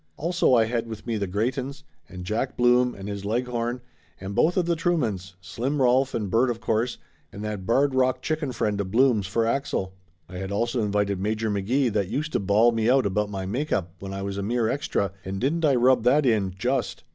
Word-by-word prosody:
Also 170 -4 +2
I 115 -2 +4
had 115 0 -2
with 110 -2 -8
me 115 -2 -1
the 100 -1 -2
Greytons, 130 +8 -2 0.3
and 90 -1 -8
Jack 110 +7 -2
Blum 125 0 +3
and 95 0 -8
his 100 -1 -5
Leghorn, 120 +2 -2 0.4
and 95 +1 -6
both 165 - +2
of 180 - +2
the 170 0 +1
Truemans, 125 - -1
Slim 120 - -3
Rolf 130 +1 +3
and 105 -4 -2
Bert 120 +3 +3
of 115 -2 -2
course, 115 +2 -1 0.3
and 100 - -8
that 105 -3 -4
Barred 135 +4 +3
Rock 130 -1 +2
chicken 155 -3 -2
friend 105 -4 -1
of 95 - -4
Blum's 115 -3 +3
for 115 +4 0
Axel. 115 -6 -1 0.3
I 90 - -9
had 95 +1 -5
also 115 +4 0
invited 100 -2 0
Major 110 +2 -1
McGee 115 +5 0
that 100 -3 0
used 150 +5 -2
to - - +2
bawl 105 +4 +4
me 115 0 +1
out 130 -1 +4
about 105 +1 0
my 95 -2 -4
make 130 +11 -3
up 85 -3 -1
when 95 0 -7
I 95 0 -4
was 100 0 -3
a - - -1
mere 115 +3 0
extra, 115 - -1
and 95 +1 -4
didn't 155 +7 0
I 140 -3 +4
rub 125 +1 +4
that 140 +4 +4
in, 100 -6 +1
just 125 +4 -1
115 Hz, 220 wpm, -25 LUFS, 100-130 Hz, 0.4 s, I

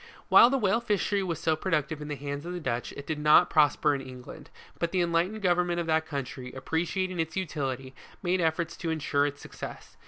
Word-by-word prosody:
While 235 - +8
the 275 - +1
whale 215 -2 +2
fishery 205 -3 0
was 170 -5 -3
so 160 -1 +1
productive 155 -3 -1
in 150 - -6
the 150 - -3
hands 145 +1 -5
of 175 +1 -5
the 180 - -4
Dutch, 120 -7 -3
it 140 - -7
did 155 0 -3
not 150 +4 +5
prosper 150 -1 +4
in 140 - -2
England: 130 -1 -10 0.3
but 170 - -1
the 185 - 0
enlightened 175 +5 0
govern 180 -1 +3
ment 175 0 -1
of 170 - -1
that 160 0 +1
country, 140 -3 -5
appreciating 175 +6 -2
its 160 +2 -2
utility, 135 -7 -3 0.3
made 180 0 +1
efforts 165 +1 0
to 165 - -3
in 160 - 0
sure 145 -1 +1
its 145 0 -7
success. - - -9
160 Hz, 220 wpm, -28 LUFS, 145-180 Hz, 0.3 s, While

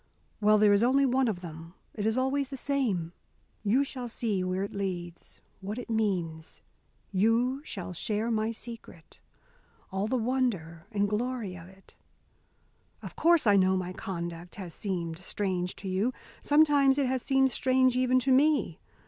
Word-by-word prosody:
Well, 215 0 +5
there 210 -1 +5
is 200 - +4
only 265 +4 +4
one 260 0 +2
of 195 -5 -2
them. 165 0 -9 0.2
It 210 -1 -2
is 220 +2 +1
always 270 +2 +1
the 270 0 -7
same. 230 - -1 0.5
You 225 +7 +3
shall 255 -3 -5
see 215 -5 -1
where 185 +1 -1
it 200 - -5
leads, 175 -4 -5 0.2
what 200 +3 -5
it 245 -2 -6
means. 180 -7 -2 0.5
You 230 +7 +2
shall 185 - -6
share 215 +6 -2
my 220 0 0
secret 225 -8 -10 0.7
all 195 +2 -1
the 255 - 0
wonder 220 -10 -1
and 205 -1 +1
glory 220 -2 -2
of 170 -1 -11
it! 190 +1 -19 1.1
Of - - -8
course 335 -3 +4
I 205 -2 +5
know 190 0 +3
my 180 0 -4
conduct, 170 -2 -6
has 185 -5 -7
seemed 170 -4 -3
strange 185 -1 -2
to 195 - -8
you. 195 +7 0 0.3
Sometimes 290 -2 +4
it 280 - +2
has 260 0 0
seemed 270 0 +2
strange 255 0 +2
even 255 0 +3
to 265 - +1
me. 290 +3 +3
215 Hz, 165 wpm, -29 LUFS, 185-255 Hz, 1.1 s, Well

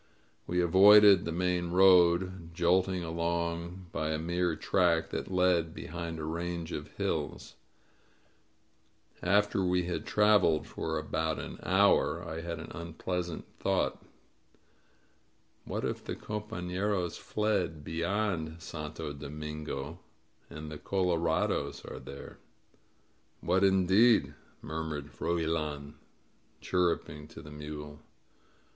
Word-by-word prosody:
We 90 - 0
avoided 100 +2 +7
the 85 - -2
main 90 0 0
road, 90 -1 +4
jolting 90 +1 +2
along 85 +2 -2
by 80 - -2
a 80 - 0
mere 85 +1 0
track 85 -1 +1
that - - -4
led 90 -3 +2
behind 85 -1 -5
a 80 - -5
range 85 +1 -3
of - - -5
hills. - - -3 1.7
After 100 +1 +2
we'd 90 +3 -1
traveled 105 -7 +4
for - - -3
about 80 0 -1
an - - -7
hour, - - +3
I 80 +1 -5
had 85 0 -4
an - - -9
unpleasant 85 0 -4
thought. - - 0 1.6
What - - -3
if - - -3
the - - -4
compafleros 100 -3 -3
fled 95 -6 -1
beyond 85 -1 -2
Santo 75 -1 -6
Do 70 0 -8
mingo 75 +1 -6 0.5
and 75 0 -8
the 75 - -7
color 90 -3 0
ados 80 -1 -1
are - - -7
there?" 70 - -10 1.0
"What 90 +3 +1
indeed?" 95 +4 +4 0.3
murmured 80 -2 -4
Froilan, 80 -3 -2 0.7
chirruping 85 -4 -1
to - - -12
the 75 - -11
mule. 75 0 -8
85 Hz, 110 wpm, -30 LUFS, 80-90 Hz, 1.7 s, avoided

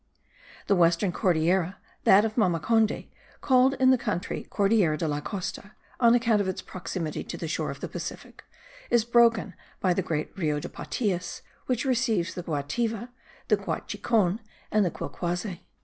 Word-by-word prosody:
The 200 - +3
western 175 +2 +3
Cordillera, 180 0 +1 0.3
that 200 +3 +7
of 220 -1 -3
Mamacondy, 215 +2 +1 0.3
called 260 0 +4
in 260 -1 +5
the 260 - +3
country 205 -7 -3
Cordillera 200 -6 +2
de 160 - -1
la 145 -1 -1
Costa, 200 +2 -5 0.3
on 235 -1 +6
account 230 -3 +3
of 195 - -2
its 185 - -2
proximity 170 -3 -4
to - - -6
the - - -4
shore - - -2
of - - -7
the - - -3
Pacific, - - -7 0.5
is 235 -2 +3
broken 235 -5 +4 0.3
by 185 -2 +2
the 190 - 0
great 155 -2 -3
Rio 155 -6 0
de - - -6
Patias, 185 -7 -3 0.2
which 250 +1 0
receives 230 -8 +1
the 180 - -5
Guativa, 220 - -2 0.4
the - - +4
Guachicon 210 -4 0 0.3
and 215 -1 +4
the 180 - +1
Quilquase. 175 +2 -4
200 Hz, 160 wpm, -27 LUFS, 175-230 Hz, 0.5 s, that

